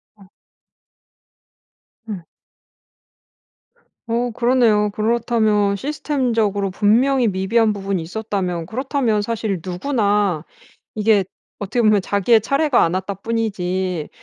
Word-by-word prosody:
어. 205 - -19 1.9
음. 185 -5 -5 1.8
어 235 +1 -1
그러네요. 235 -3 +2
그렇다면 215 -2 +1
시스템적으로 230 -8 -1
분명히 235 +5 +3
미비한 215 +4 +1
부분이 195 -3 -3
있었다면 180 -2 -3
그렇다면 245 - -1
사실 205 -4 -3
누구나 200 - 0 0.5
이게 210 -2 +3 0.4
어떻게 210 +4 -1
보면 215 -2 +4
자기의 205 +4 +2
차례가 275 +2 +2
안 170 +2 0
왔다 190 +2 -3
뿐이지 190 -5 -2
210 Hz, 245 characters per minute, -20 LUFS, 195-235 Hz, 1.9 s, 보면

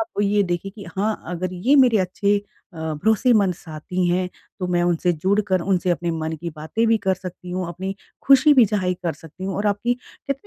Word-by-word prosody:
आप 330 -10 -3
ये 205 0 +3
देखिए 175 +2 -3
कि 200 - -9
हाँ 215 +3 +1
अगर 180 +2 -3
ये 245 +11 +3
मेरे 250 -5 +5
अच्छे 200 +2 +1 0.4
अ, - - -10
भरोसेमंद 195 - +2
साथी 170 +3 -4
हैं, 180 +1 +1 0.3
तो 180 - -1
मैं 175 -1 +1
उनसे 175 0 +2
जुड़कर 190 +3 +1
उनसे 180 0 0
अपने 170 0 0
मन 160 -1 -3
की 170 - -3
बातें 160 +10 -1
भी 225 - +5
कर 190 - +4
सकती 180 -1 -9
हूँ, 180 0 -2
अपनी 190 +3 -4 0.3
खुशी 275 +2 +6
भी 255 -4 +7
ज़ाहिर 190 -4 0
कर 170 - +1
सकती 165 +4 -11
हूँ 190 0 -3
और 205 +2 -1
आपकी 205 +4 +1
कहते 255 +2 -6
185 Hz, 205 wpm, -22 LUFS, 175-210 Hz, 0.4 s, भी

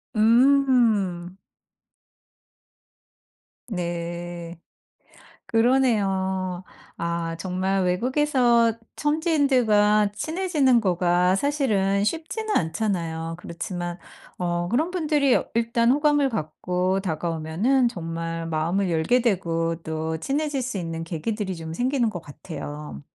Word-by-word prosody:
음. 225 -7 +3 2.3
네. 175 -2 -5 0.9
그러네요. 195 -7 +1 0.3
아 170 0 -2
정말 190 +1 -1
외국에서 240 +2 +2 0.3
현지인들과 255 - +3
친해지는 300 - +1
거가 180 -1 +2
사실은 205 -8 +1
쉽지는 330 - -2
않잖아요. 165 -3 -2
그렇지만 175 0 -5 0.4
어 175 -1 -1
그런 310 +8 +1
분들이 300 -6 +2 0.2
일단 230 +1 +2
호감을 290 0 +3
갖고 180 - -1
다가오면은 170 - 0
정말 165 -3 -5
마음을 170 +5 0
열게 170 +10 +2
되고 165 -7 0
또 160 0 -3
친해질 280 - -1
수 245 -4 -3
있는 165 -1 -4
계기들이 190 +4 -3
좀 160 0 -7
생기는 245 +1 +1
것 180 -4 -5
같아요. 150 -1 -8
195 Hz, 220 characters per minute, -24 LUFS, 170-250 Hz, 2.3 s, 음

